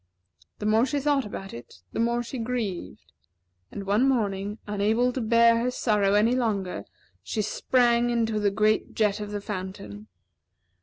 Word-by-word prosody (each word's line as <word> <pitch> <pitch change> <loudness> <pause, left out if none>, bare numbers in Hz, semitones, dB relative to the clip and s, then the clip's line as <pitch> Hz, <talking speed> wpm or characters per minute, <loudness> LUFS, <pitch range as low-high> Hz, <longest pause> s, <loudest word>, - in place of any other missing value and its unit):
The 210 - -6
more 220 +4 +3
she 285 +2 -1
thought 280 -3 +1
about 195 -1 -7
it, 115 -7 -12
the - - -3
more 235 +1 +1
she 245 +2 -6
grieved; 225 - -4 0.6
and 200 - -6
one 215 +7 +3
morning, 205 -4 -1
unable 215 +4 +1
to 260 - -3
bear 230 +1 +4
her 245 +2 0
sorrow 210 -5 +2
longer, 215 - 0 0.4
she 210 - -2
sprang 240 +2 +2
into 225 -2 0
the 205 -1 +2
great 215 +2 +1
jet 210 -1 +1
of 210 -1 -5
the 205 0 -4
fountain. 185 - -7
215 Hz, 155 wpm, -26 LUFS, 200-240 Hz, 0.6 s, bear